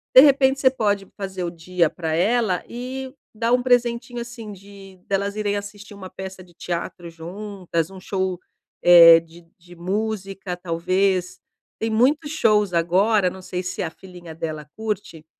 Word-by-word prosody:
de 260 - +12
repente 275 -1 +4
você 260 - +6
pode 205 -6 0
fazer 190 -2 -4
o 175 - -2
dia 170 -1 0
pra 160 -2 -4
ela 205 +2 +1
e 260 +2 -6 0.2
dar 230 +2 0
um 250 - +3
presentinho, 240 -1 +1
assim, 235 -3 -8
de 195 0 -14
delas 200 +1 -1
irem 205 -1 -1
assistir 205 0 -9
uma 190 -2 -9
peça 190 0 -8
de 175 -1 -21
teatro 170 0 -5
juntas, 175 0 -4
um 190 - -10
show, 185 -1 -2 0.4
eh, 170 -1 +9
de 165 +1 -17
de 175 +1 -16
música, 195 0 -3
talvez. 185 +2 0 0.4
Tem 225 - -2
muitos 285 +7 +2
shows 210 - +2
agora, 185 +4 +3
não 190 +1 -10
sei 180 0 -4
se 185 - -4
a 170 - -2
filhinha 175 -1 -12
dela 155 -2 -5
curte, 205 -7 -5
195 Hz, 160 wpm, -22 LUFS, 175-220 Hz, 0.4 s, de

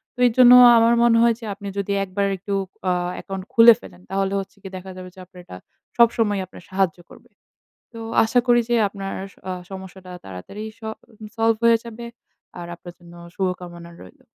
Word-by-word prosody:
তো - - -17
এজন্য 245 +1 +6 0.3
আমার 230 +1 +4
মনে 235 -1 +4
হয় 235 -1 +4
যে, 230 - -9
আপনি 200 0 -10
যদি 200 0 -2
একবার 200 +1 -2
একটু 200 +2 -6 0.4
আ - - +2 0.2
অ্যাকাউন্ট 195 -1 -7
খুলে 235 -1 +8
ফেলেন, 180 - -15
তাহলে 195 0 -1
হচ্ছে 195 - -9
গিয়ে 190 -1 -10
দেখা 190 +1 -10
যাবে 185 0 -9
যে - - -14
আপনার 180 0 -17
এটা 90 - -10 0.4
সবসময়ই 225 -4 +2
আপনার 185 - -15
সাহায্য 190 -3 0
করবে। - - -17 0.6
তো 230 - -10 0.3
আশা 235 +3 +2
করি 240 -1 +4
যে 240 - +1
আপনার 195 -1 -7 0.4
আস 180 -1 -6
সমস্যাটা 190 -1 -10
তাড়াতাড়ি 95 - -9
স - - -31 0.6
সল্ভ 225 0 +2
হয়ে 230 0 +5
যাবে। 235 +1 -9 0.5
আর 175 - -7
আপনার 175 0 -12
জন্য 175 0 -16 0.2
শুভকামনা 175 -2 -5
রইলো। 90 - -17
195 Hz, 180 wpm, -22 LUFS, 185-230 Hz, 0.6 s, খুলে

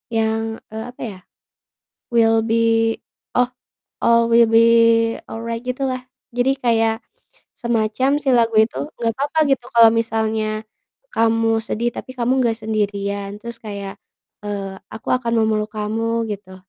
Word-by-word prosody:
yang, 220 0 +1 0.3
eee, 220 0 -5
apa - - -16
ya, 190 - -11 0.9
will 225 -1 +4
be 225 0 0 0.8
oh, 250 0 +4 0.6
all 235 0 +5
will 230 0 +6
be 225 0 +6 0.6
alright, 230 +1 -5
gitulah. 255 0 -2 0.3
Jadi 245 +2 +3
kayak 225 -2 +3 0.6
semacam 235 +2 0
si 270 - +1
lagu 230 -2 +3
itu, 220 - -2 0.2
"Nggak 230 -1 0
papa 290 +3 -1
gitu 255 -2 +1
kalau 230 -1 +8
misalnya 220 -1 -1 0.5
kamu 225 - +2
sedih 230 +1 -2
tapi - - -7
kamu 245 0 0
nggak 235 -3 +2
sendirian." 200 -2 -2
Terus 235 -1 -7
kayak, 200 -2 -7 0.5
eee, 195 -2 -4 0.2
"Aku 220 - -9
akan 250 -2 +1
memeluk 215 0 0
kamu," 225 +2 -1
gitu. 195 -2 -7
225 Hz, 135 wpm, -20 LUFS, 215-235 Hz, 0.9 s, kalau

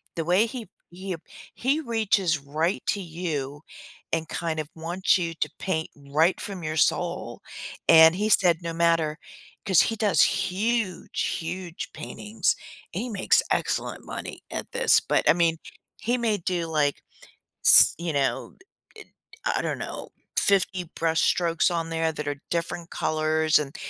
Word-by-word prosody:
The 165 - -2
way 180 +6 +4
he 230 -3 -7 0.2
he, 185 +2 -5
uh - - -10 0.4
he 275 +5 0
reaches 210 - +1
right 155 +7 -1
to 200 - 0
you, 155 -5 -4 0.5
and 165 -1 0
kind 165 -2 -3
of 155 -1 -4
wants 170 +4 +1
you 170 -2 -2
to - - +1
paint 160 -5 -2 0.2
right 160 +5 +3
from 190 -4 -6
your 155 0 -3
soul, - - 0 0.5
and 160 +1 +8
he 210 +3 0
said, 180 -5 +4
"No 170 -1 -4
matter" 165 -2 +1 0.5
'cause 190 -5 +5
he 225 - 0
does 210 -2 +3
huge, 195 +1 -1 0.2
huge 170 +1 -6
paintings, 210 +2 -2 0.4
and - - -2
he 250 - -5
makes 220 - +2
excellent - - -1
money - - -7
at - - -5
this, 485 +1 +4
but, - - +1
I - - +8
mean, 165 -1 +2 0.4
he 240 +2 0
may 225 -3 0
do, 175 -2 -2
like, 150 -3 0 0.6
s - - +8
you 170 -1 -3
know, 140 -1 -1 0.4
uh - - -11
uh - - -19 0.4
I - - +1
I - - -2
don't - - -2
know, - - -6 0.3
50 190 -2 +2
brush 165 0 +1
strokes 170 -1 +2
on 165 -1 -2
there 165 0 0
that 150 -1 -5
are 145 -1 -4
different 170 0 -3
colors, 155 0 +2
and, 145 -1 -5
170 Hz, 165 wpm, -25 LUFS, 160-195 Hz, 0.6 s, and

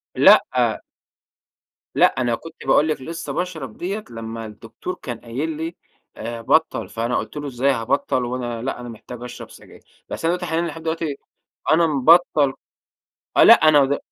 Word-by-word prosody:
لأ - - +8 1.5
لأ - - +6 0.2
أنا 120 -2 +1
كنت 165 - -12
باقول 155 - +4
لِك 155 - -2
لسّه 165 +4 -6
باشرب 160 -10 -4
ديّة، 200 +4 -4
لمّا 115 -1 -6
الدكتور 110 - -8
كان 120 -3 -6
قايل 130 +7 -4
لي 165 +2 -4 0.4
آآ 115 +1 -5
بطَّل، 160 +7 +1
فأنا 115 +2 -1
قُلت 110 +6 -5
له: 145 - -4
"إزاي 135 +1 +1
هابطَّل 125 +1 0
وأنا 120 -2 -4
لأ 135 0 -3
أنا 120 -1 -7
محتاج 120 +2 -10
أشرب 125 - -9
سجاير،" - - -18
بس - - -5
أنا 170 - +3
دلوقتي 180 0 -3
حاليًا 165 +1 -1
لحد 165 - -7
دلوقتي، 160 -2 -2 0.6
أنا 165 +2 +5
مبطَّل 150 -1 +4 0.8
آه - - +7
لأ - - +10
أنا 150 -3 +5
د 140 +1 0
140 Hz, 165 wpm, -21 LUFS, 120-160 Hz, 1.5 s, لأ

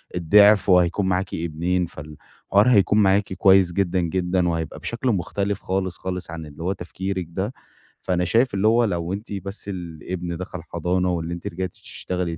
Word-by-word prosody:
الضعف 100 +4 +5
وهيكون 90 +2 +3
معاكِ 95 0 -1
ابنين، 85 +2 -1
فال 75 -2 -10 0.3
الحوار 100 +3 +4
هيكون 105 -2 +4
معاكِ 95 0 +2
كويّس 95 -1 +5
جدًا، 95 -1 +1
جدًا 90 +1 0
وهيبقى 80 -2 -3
بشكل 120 +2 -2
مختلف 100 0 -1
خالص، 95 -1 -2
خالص 90 -2 -5
عن 80 -1 -6
اللي 75 +2 -10
هو 90 - 0
تفكيرك 95 0 -4
ده. 95 +7 -3 0.5
فأنا 90 -1 0
شايف 115 +6 +2
اللي 100 +2 +2
هو 115 +2 +4
لو 85 -4 -1
أنتِ 105 +2 -6
بس 100 +1 -6
الابن 85 -1 -5
دخل 90 -1 -7
حضانة 90 +3 -1
وإن 85 -1 -3
أنتِ 85 0 -5
رجعتِ 95 +2 -3
تشتغلي 90 -3 -4
90 Hz, 170 wpm, -23 LUFS, 85-100 Hz, 0.5 s, الضعف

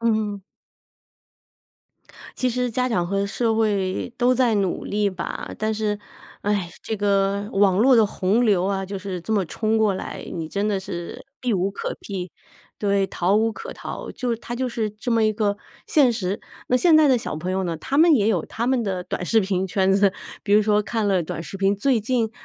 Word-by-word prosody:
嗯。 215 -3 0 2.0
其 255 - +1
实 250 0 -1
家 250 +3 0
长 180 -7 0
和 200 +2 0
社 225 +2 0
会， 205 -1 0
都 250 +1 +3
在 250 -3 +3
努 195 -3 -1
力 205 0 0
吧， 185 -2 -5
但 220 0 0
是， 210 -1 -1 0.4
唉， 200 -4 0
这 220 - -3
个， 200 0 +1
网 195 -2 +3
络 255 +4 +6
的 220 -2 +5
洪 205 +4 +1
流 200 -5 +3
啊， 195 0 -1
就 195 +1 -5
是 190 -2 -5
这 220 - -4
么 200 -3 +2
冲 220 +6 0
过 215 -3 +3
来， - - -6
你 160 -2 -4
真 200 +4 -1
的 200 - 0
是， 175 -2 -7 0.2
避 250 -3 0
无 190 +1 0
可 200 - -5
避。 185 -3 -5 0.5
对， 200 -1 +2
逃 185 +3 +1
无 220 +1 +2
可 460 - -8
逃。 - - -7
就 240 -2 -2
它 235 +1 -7
就 255 +1 -1
是 225 -2 -2
这 210 +4 -6
么 230 -1 +3
一 215 - +3
个， 205 -1 0 0.3
现 275 -6 +4
实。 200 -3 -2 0.3
那 250 - +4
现 325 +4 +5
在 310 -2 +6
的 255 -2 +4
小 225 - -4
朋 175 +4 -4
友 190 0 0
呢， 170 -2 -2
他 270 - -2
们 325 0 +7
也 215 -5 +3
有 180 -8 +1
他 235 +2 -2
们 260 -1 +2
的 185 -2 -2
短 180 - -4
视 225 +3 +4
频 190 -1 -1
圈 190 +1 +2
子。 195 0 +4 0.3
比 200 - 0
如 210 - +6
说 210 0 +3
看 220 0 -1
了 190 -3 +3
短 165 0 -4
视 195 - -7
频， 195 +1 +2
最 235 +3 +1
近， 225 0 0
205 Hz, 225 characters per minute, -23 LUFS, 195-230 Hz, 2.0 s, 们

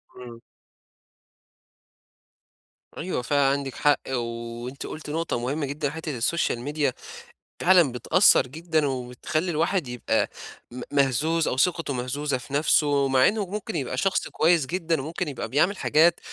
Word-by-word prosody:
إمم. 120 -2 -11 2.6
أيوه 175 -6 -3
فعلًا 140 +2 +1
عندِك 140 -2 -2
حق، 145 -1 +3
وأنتِ 120 +1 -5
قُلتِ 155 -1 -8
نقطة 160 -5 -2
مهمة 140 +5 -2
جدًا 145 +1 -2
حتّة 155 -4 -5
الSocial 145 +1 0
Media 150 -3 +1 0.7
فعلًا 175 -7 +5
بتأثّر 125 +6 +4
جدًا 160 +2 -1
وبتخلّي 130 +7 -3
الواحد 165 -1 0
يبقى 125 -1 -1 0.4
م 125 - -7
مهزوز 145 +4 +1
أو 130 - -1
ثقته 165 -2 +1
مهزوزة 130 +2 -2
في 130 +2 -12
نفْسُه، 145 -1 +3
مع 130 -1 +4
إنه 210 -1 0
ممكن 205 +1 -5
يبقى 130 -4 -3
شخص 195 +7 0
كويس 165 -3 +2
جدًا، 165 -2 -1
وممكن 165 +3 -4
يبقى 140 - -5
بيعمل 175 +9 +2
حاجات 165 +2 +3
145 Hz, 135 wpm, -25 LUFS, 130-165 Hz, 2.6 s, فعلًا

